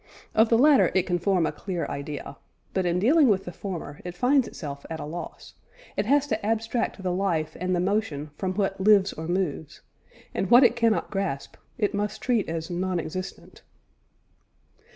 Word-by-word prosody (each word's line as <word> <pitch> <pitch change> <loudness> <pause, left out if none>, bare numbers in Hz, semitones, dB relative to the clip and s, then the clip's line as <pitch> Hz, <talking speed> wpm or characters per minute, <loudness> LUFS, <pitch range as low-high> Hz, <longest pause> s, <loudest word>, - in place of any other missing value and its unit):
Of 220 +1 +4
the 230 - +5
latter 285 +2 +5
it 190 - +4
can 175 -1 -1
form 180 -2 +2
a - - 0
clear 180 -4 -4
idea; 140 0 -6 0.4
but 185 -2 0
in 175 0 +1
dealing 275 - +5
with 195 -4 +2
the 175 - -5
former, 175 -7 -6
it 180 0 -6
finds 260 +3 +3
itself 140 -4 -7
at 160 -1 -5
a - - -5
loss; 165 +4 -8 0.4
it 200 - -1
has 285 +2 +4
to 220 -6 -2
abstract 225 -1 -1
the 180 - 0
life 170 -5 -1
and 185 +1 0
the - - 0
motion 175 -7 -1
from 185 +3 -3
what 195 -1 -1
lives 200 -1 +5
or 160 +1 -6
moves, 175 -4 -2 0.5
and 190 - -2
what 245 +3 +8
it 245 - +5
cannot 230 -2 +1
grasp, 195 -9 -3 0.2
it 210 -2 0
must 205 +1 -2
treat 235 -8 0
as 165 0 -3
non 180 0 -1
existent. 185 +4 -7
190 Hz, 185 wpm, -26 LUFS, 170-220 Hz, 0.5 s, what